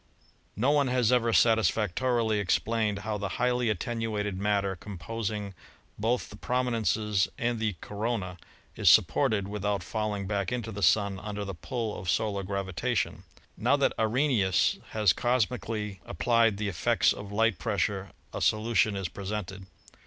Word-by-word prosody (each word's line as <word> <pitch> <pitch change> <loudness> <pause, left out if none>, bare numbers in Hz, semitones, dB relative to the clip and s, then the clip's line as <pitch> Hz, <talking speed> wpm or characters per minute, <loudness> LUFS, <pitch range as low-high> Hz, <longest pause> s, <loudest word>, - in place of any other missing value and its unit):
No 125 +8 +2
one 145 -2 +3
has 125 -3 +2
ever 120 -2 +3
satisfactorily 110 0 +2
explained 105 +1 0
how 105 -1 -2
the 100 -1 -4
highly 125 -1 +1
attenuated 105 -1 -2
matter 100 0 0
composing 105 +2 -5 0.5
both 115 +4 0
the - - -9
prominences 110 -5 0
and 120 -1 -1
the 110 -3 -1
corona 105 -4 -3 0.4
is - - +4
supported 100 -3 +4
without 100 -2 -2
falling 105 0 -2
back 100 +1 -2
into 120 -2 -3
the 100 -1 -6
Sun 100 -1 +3
under 105 0 -5
the 95 - -5
pull 115 - -4
of 90 - -5
solar 100 0 0
gravitation. 95 -2 -2 0.3
Now - - +2
that - - +2
Arrhenius 110 -4 +2
has 105 -5 +3
cosmically 110 -5 -1
applied 115 +3 +2
the 105 0 -2
effects 90 -4 +2
of 100 0 -9
light 110 -1 +1
pressure 100 -3 -1 0.2
a - - -4
solution 110 -1 +2
is 95 -2 -2
presented. 95 0 -6
105 Hz, 140 wpm, -28 LUFS, 100-115 Hz, 0.5 s, is